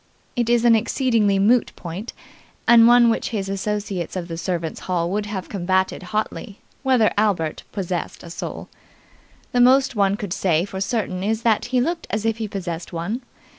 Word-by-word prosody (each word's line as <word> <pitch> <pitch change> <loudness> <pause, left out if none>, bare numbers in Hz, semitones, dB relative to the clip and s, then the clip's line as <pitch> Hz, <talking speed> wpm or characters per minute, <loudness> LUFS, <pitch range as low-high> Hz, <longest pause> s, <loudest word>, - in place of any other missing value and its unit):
It 240 -1 0
is 240 0 +3
an 235 -1 +7
exceedingly 225 -3 +2
moot 225 +4 +3
point 180 +7 -6 0.6
and 230 -1 +8
one 240 -1 +6
which - - -2
his 205 -4 -3
associates 195 -3 -3
of 175 -2 -4
the 165 - -4
servants' 170 -1 -3
hall 175 -1 0
would 210 +1 -1
have 195 -3 -5
combated 190 -1 0
hotly 215 -1 -3 0.2
whether 255 -5 +3
Albert 180 -7 0
possessed 185 -3 -4
a 170 - -9
soul. - - -6 0.8
The 245 - +3
most 265 +1 +5
one 200 -1 +2
could 200 -4 -4
say 170 -2 +1
for 190 -1 -6
certain 195 -3 -2
is 220 +2 -1
that 225 -3 +2
he 250 +1 +1
looked 330 +6 -1
as 210 +1 -2
if 225 0 +1
he 220 -1 -3
possessed 175 -4 -5
one. 195 +9 -3
205 Hz, 175 wpm, -22 LUFS, 185-230 Hz, 0.8 s, and